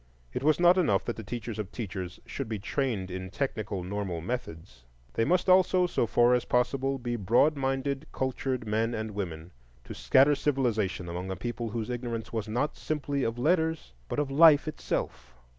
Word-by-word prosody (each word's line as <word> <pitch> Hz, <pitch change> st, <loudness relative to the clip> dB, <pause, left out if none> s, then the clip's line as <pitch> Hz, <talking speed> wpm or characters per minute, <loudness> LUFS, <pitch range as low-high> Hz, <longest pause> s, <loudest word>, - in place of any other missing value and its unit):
It -, -, -2 dB
was 155 Hz, +3 st, +3 dB
not 175 Hz, +1 st, +6 dB
enough 100 Hz, -, +2 dB
that 120 Hz, -, -2 dB
the -, -, -7 dB
teachers 115 Hz, 0 st, -5 dB
of 105 Hz, -2 st, -4 dB
teachers 95 Hz, -6 st, -5 dB
should 135 Hz, -5 st, -5 dB
be 110 Hz, -, -2 dB
trained 105 Hz, -3 st, -2 dB
in 95 Hz, 0 st, -5 dB
technical 105 Hz, -4 st, -3 dB
normal 95 Hz, -2 st, -3 dB
methods; 80 Hz, -, -6 dB, 0.3 s
they 115 Hz, -, +1 dB
must 180 Hz, +9 st, +2 dB
also, 185 Hz, 0 st, +5 dB
so 145 Hz, -9 st, 0 dB
far 120 Hz, +2 st, +4 dB
as 125 Hz, -, +2 dB
possible, 135 Hz, +2 st, 0 dB
be 120 Hz, -2 st, -3 dB
broad 120 Hz, +8 st, +3 dB
minded, 135 Hz, +1 st, -2 dB
cultured 130 Hz, -2 st, -2 dB
men 110 Hz, +2 st, 0 dB
and 110 Hz, 0 st, -4 dB
women, 85 Hz, -4 st, -5 dB, 0.3 s
to -, -, -8 dB
scatter 135 Hz, +3 st, +4 dB
civilization 120 Hz, -11 st, 0 dB
among 90 Hz, +2 st, -5 dB
a 95 Hz, -, -2 dB
people 120 Hz, +4 st, -4 dB
whose 110 Hz, +1 st, -3 dB
ignorance 120 Hz, -2 st, -4 dB
was 110 Hz, -1 st, -2 dB
not 125 Hz, +7 st, -1 dB
simply 145 Hz, -2 st, -2 dB
of 115 Hz, +1 st, -1 dB
letters, 160 Hz, -, 0 dB, 0.2 s
but -, -, -3 dB
of 145 Hz, -2 st, 0 dB
life 155 Hz, +1 st, +7 dB
itself. 65 Hz, -, -4 dB
120 Hz, 180 wpm, -28 LUFS, 100-140 Hz, 0.3 s, life